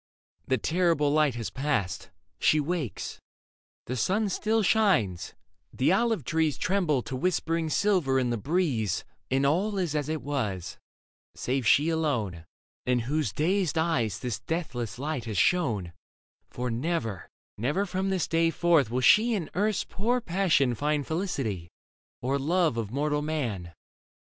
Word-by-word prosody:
The 130 - +2
terrible 165 - +2
light 150 -4 +3
has 115 -2 -4
passed; 135 -10 -2 0.3
She 155 - +4
wakes; 150 - -3 0.7
the 125 - -3
sun 200 - +1
still 220 +3 +1
shines, 180 - +2 0.4
the 130 - +2
olive 225 -3 +2
trees 155 +3 0
Tremble 175 -9 +1
to 130 - -5
whispering 165 +1 0
silver 175 -8 +2
in 125 -2 +1
the - - +1
breeze 130 - 0 0.2
And 135 +1 +2
all 195 +8 +1
is 175 -5 -1
as 150 -1 -1
it 155 -2 -2
was, 110 -11 -3 0.6
save 130 -1 -1
she 150 +3 +5
alone 120 - -1 0.4
In 125 -1 +2
whose 140 -1 -1
dazed 170 - 0
eyes 160 -10 +1
this 125 -4 -3
deathless 120 - -4
light 140 -3 -3
has 110 -4 -4
shone: 105 - +1 0.6
For 125 0 -3
never, 120 - -2 0.3
never 150 - 0
from 190 +1 -2
this 190 -3 0
day 165 0 +2
forth 165 -7 +3
will 125 +2 -1
she 225 - +5
In 175 -7 -4
earth's 210 +2 +1
poor 240 +5 -1
passion 170 - +2
find 145 +3 0
felicity. 135 - -2 0.5
Or 135 +3 0
love 165 0 +2
of 115 -3 -3
mortal 145 +4 0
man. 120 - -3
150 Hz, 145 wpm, -28 LUFS, 125-175 Hz, 0.7 s, she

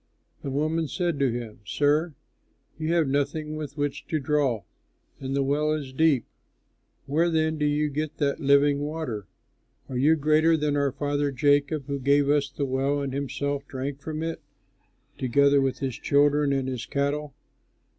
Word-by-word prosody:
The 140 - -4
woman 155 +4 0
said 170 -2 -2
to 135 -3 +2
him, 115 -2 -6
"Sir, 150 +7 +1 0.6
you 155 +1 -1
have 170 -3 +3
nothing 145 +3 -1
with 150 -1 -6
which 145 +1 -3
to 155 - -1
draw 135 -6 0 0.6
and 135 0 -3
the 140 - +2
well 150 +3 +1
is 140 -4 -4
deep; 145 -4 +3 0.8
where 160 +5 +2
then 160 -1 0
do 150 - +2
you 150 +1 +1
get 150 +1 -4
that 145 0 0
living 140 0 +4
water? 145 - -4 0.6
Are 130 - -3
you 150 +5 +5
greater 155 +2 +3
than 150 -1 0
our 140 -1 +1
father 145 +1 -1
Jacob 145 +1 +2
who 140 -1 -3
gave 140 +1 +3
us 145 -1 +2
the 140 +1 -3
well 135 +2 0
and 140 -2 -3
himself 140 0 -3
drank 135 +1 -5
from 155 +1 -4
it, 165 0 -4 0.8
together 140 +2 +4
with 135 -1 0
his 130 -2 -3
children 145 0 +3
and 135 -1 0
his 125 -3 -4
cattle?" 145 +1 -2
145 Hz, 165 wpm, -26 LUFS, 140-150 Hz, 0.8 s, you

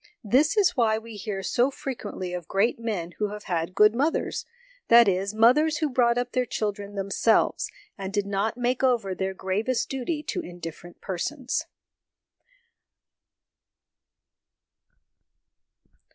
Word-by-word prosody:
This 275 - +3
is 390 -4 +5
why 225 -4 +3
we 225 0 -9
hear 200 -1 -4
so 245 +7 +2
frequently 210 -9 -5
of 175 -2 -5
great 215 +5 +1
men 205 -7 -3
who 210 - +1
have 210 0 -7
had 170 0 -2
good 210 +1 +6
mothers 285 +7 -1 0.4
that 235 -1 +7
is, 195 +2 0
mothers 300 +8 +4
who 305 -3 -1
brought 240 -1 +3
up 245 - -1
their 250 -1 0
children 205 -2 -3
themselves, 200 +3 +1 0.3
and 190 0 -4
did 205 0 0
not 200 +3 -1
make 245 +1 0
over 235 -7 +2
their 190 +1 -3
gravest 210 +7 -1
duty 275 +4 -3
to - - -3
indifferent 175 0 -9
persons. 245 - -3
220 Hz, 130 wpm, -26 LUFS, 195-250 Hz, 0.4 s, that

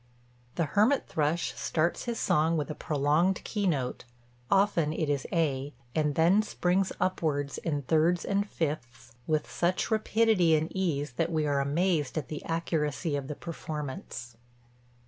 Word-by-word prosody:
The 165 - +1
hermit 215 - +2
thrush 155 +2 0
starts 165 +2 0
his 235 -1 -2
song 160 +2 +2
with 150 0 -2
a - - -2
prolonged 155 +6 +1
keynote 170 - -1 0.5
(often 195 -6 +3
it 155 -1 -1
is 140 -2 -1
A) 145 -5 0 0.2
and 150 -2 +1
then 175 +6 +5
springs 190 -2 0
upwards 145 -6 -1
in 145 -4 -2
thirds 165 +5 +2
and 200 +1 0
fifths 145 -7 -4 0.2
with 155 -1 +1
such 180 +5 0
rapidity 215 -6 +3
and 155 +1 -1
ease 150 -7 -1
that 165 +1 0
we 155 -2 +1
are 145 -1 +1
amazed 155 +1 0
at 150 - -3
the 150 - -5
accuracy 160 -2 -1
of 140 -2 -3
the 150 - -4
performance. 145 -7 -6
160 Hz, 145 wpm, -29 LUFS, 145-180 Hz, 0.5 s, then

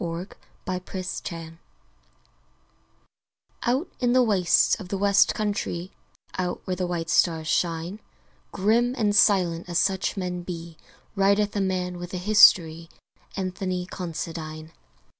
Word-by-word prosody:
Anthony 180 +2 -6
Considine 165 -3 -6 2.0
Out 260 +8 0
in 245 -1 +2
the 255 0 +5
wastes 195 -7 +3
of 195 - -8
the 195 - -3
West 200 +1 +3
countrie, 200 -4 -3 0.5
Out 180 -1 -2
where 185 - -2
the 180 0 -2
white 165 -2 -3
stars 160 -1 +2
shine, 170 +5 -1 0.5
Grim 230 +6 +1
and 210 -3 +1
silent 180 -5 +3
as 175 - -1
such 190 +1 0
men 180 -2 -3
be, 170 -2 -7 0.4
Rideth 200 +1 +2
a 200 - +1
man 180 -2 -2
with 175 +1 -6
a - - -2
history 175 -5 +5 0.5
Anthony 185 -1 -3
Considine. 160 -3 -6
180 Hz, 120 wpm, -25 LUFS, 170-200 Hz, 2.0 s, the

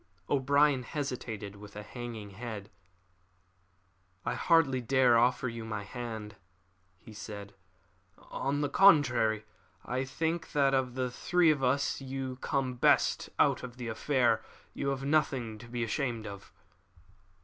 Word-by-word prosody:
O'Brien 140 0 +3
hesitated 120 -7 -5
with 105 0 -12
a 105 - -6
hanging 115 -3 -7
head. 110 -1 -7 1.5
"I - - 0
hardly 160 -7 +3
dare 125 0 +4
offer 125 +2 +3
you 115 -1 -5
my 105 -2 -4
hand," 110 -1 -7 0.6
he 110 +5 -14
said. 105 -1 -8 0.6
"On 140 +2 -3
the 145 - +1
contrary. 125 - +4 0.4
I 130 +2 -1
think 160 +5 -2
that 140 -2 +3
of 130 -2 0
the 130 -1 -1
three 175 +5 +3
of 140 -3 -1
us 135 +2 +1
you 130 -1 -4
come 130 -1 -1
best - - +3
out - - +3
of 125 -1 -8
the 120 -2 -5
affair. 115 -1 +1 0.3
You 140 - -3
have 135 -1 -2
nothing 135 -7 0
to 120 - -11
be 120 0 -3
ashamed 115 -1 -2
of." 100 -1 -9
125 Hz, 140 wpm, -31 LUFS, 110-135 Hz, 1.5 s, dare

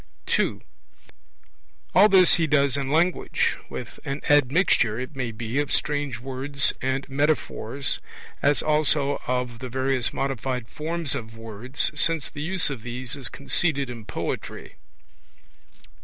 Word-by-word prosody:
(2) - - 0 1.3
All 205 +3 +7
this 185 -2 +7
he 165 -2 +1
does 140 -2 +3
in 140 -1 -2
language, 170 +5 +1
with - - -7
an 140 +1 -3
admixture, 140 - +3
it 130 +4 -6
may 125 -3 -2
be, 115 +4 -3
of 145 -1 -1
strange 145 -4 0
words 135 +2 0
and 130 +1 -1
metaphors, 140 -2 -1 0.4
as 145 0 +3
also 150 -2 +2
of 125 -2 -2
the 130 - -6
various 130 0 0
modified 130 -2 -2
forms 160 0 0
of 115 0 -6
words, 115 +3 -2
since 155 0 0
the 145 - -7
use 175 -1 0
of 130 -5 -5
these 125 +1 -5
is 140 -3 0
conceded 140 -2 0
in 115 -2 -8
poetry. - - -5
135 Hz, 135 wpm, -25 LUFS, 125-150 Hz, 1.3 s, All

